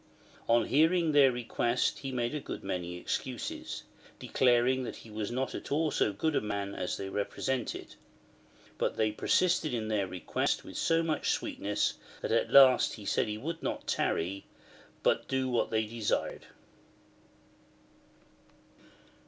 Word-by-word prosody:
On 115 -1 +4
hearing 160 +3 +3
their 140 -3 +6
request 120 0 0
he 135 -1 -5
made 125 +4 -3
many 90 -2 -3
excuses, 90 - -4 0.3
declaring 125 +1 +2
that - - -5
he 115 - -13
was 105 -1 -3
not 130 +2 -2
at - - -7
all 155 +1 +1
so 105 - +2
good 150 +10 -1
a - - +2
man 100 -1 -3
as 90 - -3
they 95 - -5
repre 100 +1 -3
sented. 130 -4 -2 0.9
But - - 0
they 110 -1 +2
persisted 165 +4 +2
in 110 -2 -3
their 105 -3 0
request 90 0 -1
with - - -10
so 165 0 +2
much 160 -2 -1
sweetness, 100 0 -1 0.2
that - - -2
at - - +2
last 135 -2 +7
he 105 - -11
said - - +1
he 105 0 -3
would 165 +8 -5
not - - -3
tarry, 95 +4 -1 0.6
but - - +2
do 130 -1 0
what 120 -2 +1
they 110 -1 +1
desired. 110 -1 -2
120 Hz, 145 wpm, -31 LUFS, 105-140 Hz, 0.9 s, last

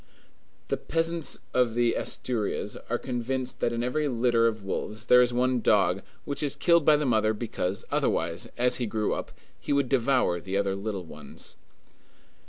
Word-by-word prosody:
The - - 0
peasants 165 0 -1 0.2
of 120 -2 +2
Asturias 115 -3 -1
are 120 - +1
convinced 130 +1 -3
that - - +1
in 120 0 -2
every 150 +5 0
litter 120 -2 +3
of 110 -2 -2
wolves 105 +3 -4
there 125 0 +7
is 125 -1 +3
one 125 0 +1
dog, - - +3 0.2
which 140 - -2
is 145 -2 0
killed 170 -2 +4
by 150 0 +6
the 150 - -1
mother 110 -3 +2
because, 100 -4 -3
otherwise, 85 +1 0
as 125 +1 +2
he 120 -2 -2
grew 105 0 -1
up, - - -5 0.3
he - - -5
would 140 -3 +2
devour 125 -9 +2
the 95 +2 -2
other 100 -1 0
little 100 -2 -4
ones. 75 -3 -9
120 Hz, 170 wpm, -27 LUFS, 105-130 Hz, 0.3 s, there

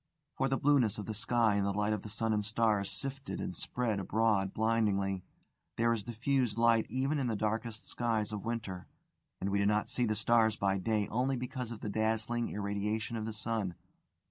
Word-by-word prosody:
For 135 0 +1
the 135 - +1
blueness 135 -7 +3
of 105 - -5
the 110 - -3
sky 110 0 +2
in 100 - +2
the 100 - +1
light 105 +1 +1
of 105 - -2
the 105 - -8
sun 110 +1 0
and 105 -1 +1
stars 110 -2 +1
sifted 135 +7 -4
and 90 - -4
spread 115 +2 -1
abroad 100 -1 +2
blindingly: 100 -4 +1 0.5
there 115 0 +3
is 110 -3 -3
diffused 120 -1 0
light 115 -1 +4
even 135 +5 0
in 130 - 0
the 115 - 0
darkest 110 +2 -2
skies 110 -3 -1
of 105 -2 -4
winter, 110 -6 -4 0.5
and 100 +1 -1
we 100 - +2
do 100 - +2
not 105 0 +1
see 125 -1 +1
the 110 - +1
stars 110 0 +3
by 95 -1 +1
day 105 +1 0
only 130 +4 +1
because 125 -1 -4
of 115 -3 -7
the - - -4
dazzling 110 +2 0
irradiation 105 +2 -2
of 110 -1 -3
the 110 - -3
sun. 110 -4 -2
110 Hz, 200 wpm, -32 LUFS, 105-120 Hz, 0.5 s, light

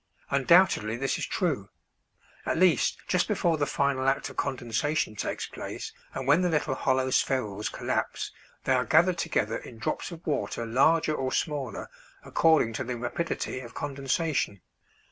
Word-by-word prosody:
Undoubtedly 140 - +4
this 135 +2 -1
is - - -2
true; 140 - -1 0.7
at - - -1
least 175 -6 +3
just - - +2
before 170 -2 +1
the 145 -1 0
final 140 -2 0
act 135 - -1
of - - -14
condensation 135 0 -1
takes - - -3
place; - - -7 0.2
and 130 - -3
when 150 +5 +5
the 180 - +2
little 150 -3 +1
hollow 130 0 +1
spherules 105 -7 0
collapse - - -2 0.3
they 130 - +2
are 125 -1 +3
gathered 170 +4 +4
together 110 -8 0
in 115 - -11
drops 110 - -3
of 170 0 -10
water 145 -6 -1
larger 155 +7 +3
or 130 -3 -2
smaller 140 -7 -2 0.4
according 160 -8 +3
to 125 - -2
the 125 -1 -4
rapidity 130 +3 -3
of 120 -2 -10
condensation. 140 - -1
135 Hz, 155 wpm, -28 LUFS, 120-160 Hz, 0.7 s, when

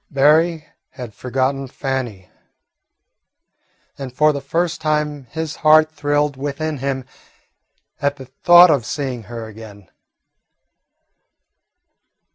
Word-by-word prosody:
Berry 155 +3 +3 0.3
had 120 -4 -8
forgotten 130 +3 -2
Fannie, 125 -8 -4 1.7
and 135 -2 -6
for 150 +4 +3
the 140 - -4
first 165 +4 -2
time 150 -2 -1
his 160 +2 -5
heart 155 0 +5
thrilled 145 -1 0
within 145 +2 -4
him 135 -1 -3 1.0
at 140 0 0
the 135 - -11
thought 175 +6 +6
of 140 -6 +1
seeing 130 -1 -4
her 115 -1 -6
again. 105 -3 -13
140 Hz, 100 wpm, -19 LUFS, 130-155 Hz, 1.7 s, thought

